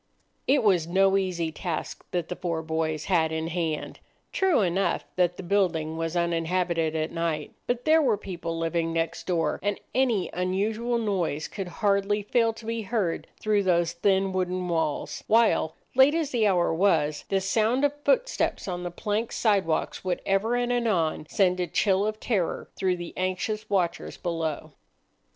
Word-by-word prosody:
It 270 -1 +4
was 180 -6 +3
no 195 +2 +3
easy 180 -4 0
task 165 -1 -4
that 175 -2 -2
the 180 - -4
four 165 -3 -3
boys 160 -1 -2
had 165 -4 +2
in 160 +1 -2
hand. 165 -3 -3 0.3
True 375 - +3
enough 190 +1 0
that 180 -1 +1
the - - -6
building 170 -5 +1
was 165 +1 -3
uninhabited 170 -1 0
at 155 0 -1
night, 165 -3 -2
but 245 0 -1
there 320 +1 +5
were 240 -8 +2
people 175 -4 -5
living 165 0 -1
next 165 0 -2
door, 170 -3 0
and 205 +1 -1
any 245 -8 +1
unusual 210 +6 0
noise 185 -9 -1
could 195 -2 -5 0.2
hardly 200 +1 +2
fail 230 +2 +2
to 225 0 -12
be 230 0 -2
heard 205 -5 -1
through 210 -1 +2
those 175 -3 +2
thin 190 +2 +1
wooden 185 -1 -1
walls; 160 -3 -1
while, 225 -8 +3 0.2
late 265 +4 +6
as 320 -4 -1
the 225 -4 +2
hour 175 -4 +2
was, 160 -5 +2
the 195 - +2
sound 220 +7 +2
of 285 - +1
footsteps - - +1
on 180 -1 -3
the 175 - -3
plank 210 +5 -2
side 205 -6 +2
walks 160 - -1
would 185 -2 -1
ever 200 +5 +1
and 245 0 0
anon 185 -11 0
send 185 -2 +2
a 180 - 0
chill 195 +4 +2
of 215 0 -3
terror 200 -9 -1
through 185 -2 0
the 175 -1 -7
anxious 185 +4 -2
watchers 185 -4 -1
below. 165 -3 -3
185 Hz, 170 wpm, -26 LUFS, 165-215 Hz, 0.3 s, late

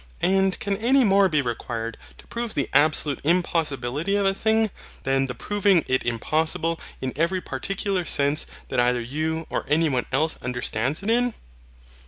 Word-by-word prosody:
And 190 0 +2
can 200 -1 -1
any 255 +5 +3
more 195 -2 +4
be 150 -4 +1
required 115 -2 -4 0.2
to - - -16
prove 235 -1 -4
the 140 - 0
absolute 150 -1 +3
impossibility 160 -1 0
of 200 -1 +1
a 195 - +3
thing, 220 +1 +1 0.3
than 135 0 +1
the 125 - -5
proving 200 -5 +2
it 130 0 +1
impossible 160 +7 0 0.2
in 130 -1 -3
every 170 +5 +1
particular 190 +6 -2
sense 145 -1 +1 0.2
that - - 0
either 120 0 +3
you 155 +7 -2
or - - -1
any 160 +1 +3
one 125 -3 -1
else 155 +5 0
understands 125 - -2
it 215 - +1
in? 245 0 +2
160 Hz, 165 wpm, -24 LUFS, 135-195 Hz, 0.3 s, more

